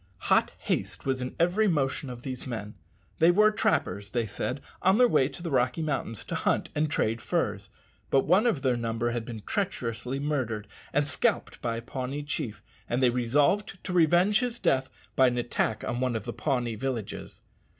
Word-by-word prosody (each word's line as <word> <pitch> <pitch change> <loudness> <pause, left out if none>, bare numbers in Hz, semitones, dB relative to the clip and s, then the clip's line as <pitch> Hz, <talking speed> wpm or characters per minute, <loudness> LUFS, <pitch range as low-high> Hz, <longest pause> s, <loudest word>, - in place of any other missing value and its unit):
Hot - - +4
haste 100 +3 -2
was 130 -1 0
in 125 - -4
every 180 +6 +3
motion 140 -5 0
of 120 -1 -8
these 130 -2 -5
men. 110 -4 -5 0.5
They 165 - +6
were 210 +4 +5
trappers, 105 - 0
they 120 0 0
said, 125 +6 -3 0.2
on 190 +2 +4
their 250 0 +6
way 130 - +3
to 175 - -10
the 165 - -3
Rocky 130 +4 +1
Mountains 135 -7 -2
to - - -5
hunt - - 0
and 150 +1 +1
trade 115 -5 0
furs. - - -1 0.4
But 135 - +4
one 190 +8 +4
of 160 - 0
their 130 -2 +3
number 115 0 -1
had 120 -1 -3
been 110 -3 -7
treacherously 130 - -2
murdered 130 -8 -2 0.2
and 145 +1 +1
scalped - - 0
by 115 -1 -1
a 115 - -6
Pawnee 130 +3 -4
chief, 145 -7 -4 0.3
and 125 +2 +1
they 125 - +5
resolved 145 - +2
to 185 - -4
revenge 175 +5 +4
his 245 -2 -2
death 130 - +1 0.3
by 130 - +6
an 125 0 0
attack 120 -2 -1
on 120 - -2
one 125 -2 0
of 110 - -3
the - - -4
Pawnee 125 -5 -1
villages. 115 -2 -5
130 Hz, 190 wpm, -28 LUFS, 120-160 Hz, 0.5 s, They